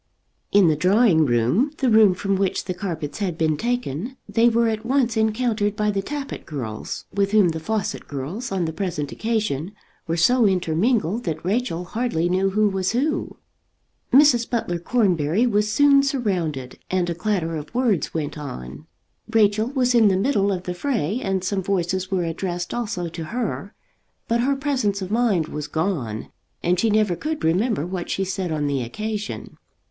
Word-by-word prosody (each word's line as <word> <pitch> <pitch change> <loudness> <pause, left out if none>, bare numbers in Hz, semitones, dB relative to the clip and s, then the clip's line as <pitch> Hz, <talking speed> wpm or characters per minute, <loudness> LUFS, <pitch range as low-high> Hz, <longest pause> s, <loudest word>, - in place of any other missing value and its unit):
In 200 -3 +6
the 155 - +3
drawing 180 -2 +4
room, 130 - +2
the 265 - 0
room 215 -4 +6
from 195 +2 -1
which 190 -1 0
the 185 - -2
carpets 165 -6 -5
had 185 -6 -2
been 155 -2 +1
taken, 240 - -3
they 235 +1 +4
were 235 0 +2
at 220 -1 -2
once 245 -1 +1
encountered 220 -1 +1
by 210 0 +1
the 200 -1 -1
Tappitt 285 +6 -5
girls, 120 -9 -5
with 200 0 0
whom 205 -5 +5
the 160 0 -3
Fawcett 210 +5 -3
girls 155 - -5
on 185 -3 0
the 160 - -3
present 155 -5 -3
occasion 210 -7 -2 0.3
were 165 +1 -1
so 235 +7 +4
intermingled 190 +4 +1
that 165 -1 -3
Rachel 200 -3 -1
hardly 180 -5 -1
knew 190 +2 +2
who 210 +2 +2
was 190 0 -1
who. 285 +6 -1 0.7
Mrs. 265 -4 +5
Butler 175 -8 -1
Cornbury 180 -2 +2
was 210 -2 +1
soon 280 +3 +5
surrounded, 180 - -2
and 185 -1 +1
a 170 - -1
clatter 175 -2 -1
of 150 -1 -6
words 240 -8 +1
went 150 -1 -4
on. 70 - -8 0.4
Rachel 215 0 +3
was 255 -2 +1
in 230 -3 +6
the 190 -2 +3
middle 200 -2 +2
of 180 -2 -2
the 180 - -3
fray, 225 - -1
and 195 -5 -1
some 195 +1 -1
voices 185 0 -1
were 190 -3 0
addressed 175 +1 -3
also 210 -7 -2
to 165 0 -6
her; 220 -1 -4 0.5
but 235 +1 +1
her 275 +3 +2
presence 255 -8 -1
of 185 - -6
mind 215 -9 +2
was 150 -1 -5
gone, 155 - -2 0.3
and 175 +1 +2
she 225 - +2
never 210 -4 +2
could 310 - -4
remember 180 - +1
what 180 -1 -5
she 195 - 0
said 185 -2 -3
on 150 -2 -1
the 140 -2 0
occasion. 210 - -5
195 Hz, 175 wpm, -23 LUFS, 165-230 Hz, 0.7 s, In